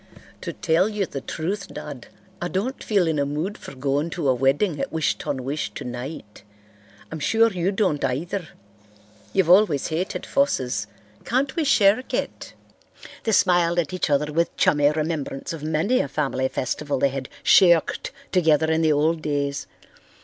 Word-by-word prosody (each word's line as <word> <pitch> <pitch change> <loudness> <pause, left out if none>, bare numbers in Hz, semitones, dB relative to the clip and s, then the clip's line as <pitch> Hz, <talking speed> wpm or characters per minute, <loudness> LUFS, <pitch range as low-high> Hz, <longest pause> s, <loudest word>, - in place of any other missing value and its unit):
To - - -4
tell 175 +4 +1
you 210 -2 -1
the 140 -5 -6
truth, 195 +9 -4
Dad, 145 -4 -8 0.3
I 175 - -1
don't 210 +9 -3
feel 200 -5 +2
in 160 -2 0
a - - +2
mood 155 +8 -3
for 140 - -11
going 140 +4 -1
to 150 -6 +1
a - - +5
wedding 140 +6 +1
at - - -3
Wish 160 -1 0
ton 130 -2 -3
wish 145 +3 -3
tonight. 125 -3 -7 0.7
I'm 160 - -5
sure 225 +8 +3
you 180 0 0
don't 190 -8 0
either. 165 +7 -2 0.8
You've 180 -3 +2
always 180 -7 +4
hated 170 +4 -3
fusses. 125 - 0 0.4
Can't 265 +3 0
we 330 - +1
shirk 220 -2 +3
it?" - - -4 0.7
They 225 - +1
smiled 175 -4 +3
at 175 0 0
each 185 - -1
other 150 +1 +1
with 170 +2 0
chummy 145 -1 +4
remembrance 155 -2 -3
of 160 - -7
many 160 +11 +1
a - - 0
family 135 -2 -1
festival 140 +3 -2
they 140 - +2
had 135 -1 -5
"shirked" 175 -4 +4 0.2
together 160 -3 +3
in 160 0 +2
the 160 -1 +3
old 155 +2 +1
days. 140 -2 -2
160 Hz, 165 wpm, -23 LUFS, 140-185 Hz, 0.8 s, a